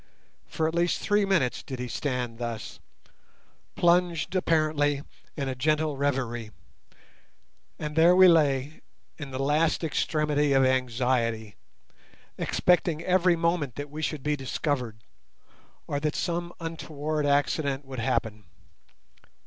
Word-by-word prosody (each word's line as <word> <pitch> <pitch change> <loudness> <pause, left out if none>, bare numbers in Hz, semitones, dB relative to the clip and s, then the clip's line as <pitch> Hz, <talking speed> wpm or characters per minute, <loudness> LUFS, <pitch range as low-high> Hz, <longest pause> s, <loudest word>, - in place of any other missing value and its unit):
For 160 - -1
at 160 - -3
least 170 +1 +1
three 205 0 +2
minutes 165 -11 +1
did 130 - -7
he 125 0 -4
stand 120 -1 -3
thus, 115 -2 -5 1.0
plunged 175 -1 +2
apparently 155 -5 +1 0.3
in 140 -2 -2
a 130 - -1
gentle 155 +3 0
reverie, 130 -5 -2 1.3
and 150 0 -5
there 170 +2 +6
we 185 0 +8
lay 150 -3 +2 0.4
in 145 -3 -6
the 130 - -5
last 150 +5 +1
extremity 150 -2 +1
of 135 -1 +4
anxiety, 120 -4 0 0.8
expecting 170 -2 +1
every 180 -1 +3
moment 165 -7 0
that 145 0 -6
we 155 +1 -6
should 155 -3 -3
be 150 0 +1
discovered 130 -5 -3 0.8
or 145 - -2
that 150 +1 -2
some 175 0 -2
untoward 155 -2 -3
accident 140 -1 0
would 130 -2 -7
happen. 110 -2 -2
145 Hz, 125 wpm, -27 LUFS, 130-165 Hz, 1.3 s, we